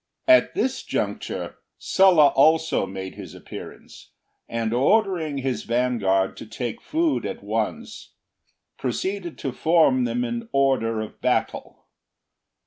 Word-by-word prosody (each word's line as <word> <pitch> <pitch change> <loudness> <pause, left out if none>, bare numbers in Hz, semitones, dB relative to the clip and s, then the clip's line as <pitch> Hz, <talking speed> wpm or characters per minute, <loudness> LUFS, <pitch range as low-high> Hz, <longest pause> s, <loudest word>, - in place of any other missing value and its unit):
At 320 -1 +5
this 255 +3 -1
juncture, - - -4 0.2
Sulla 180 -7 +5
also 160 -6 +3
made 95 0 -7
his 95 -5 -10
appearance, - - -11 0.4
and 115 -1 -2
ordering 165 - +1
his 130 -4 -2
vanguard 115 -6 +1
to - - -9
take 125 - -5
food 330 -2 0
at - - -6
once, - - -4 0.6
proceeded 190 -3 -3
to 135 - -4
form 155 -5 +3
them 120 +1 -1
in 115 -1 -4
order 130 -5 +1
of 110 - -9
battle. - - -2
130 Hz, 120 wpm, -23 LUFS, 115-170 Hz, 0.6 s, At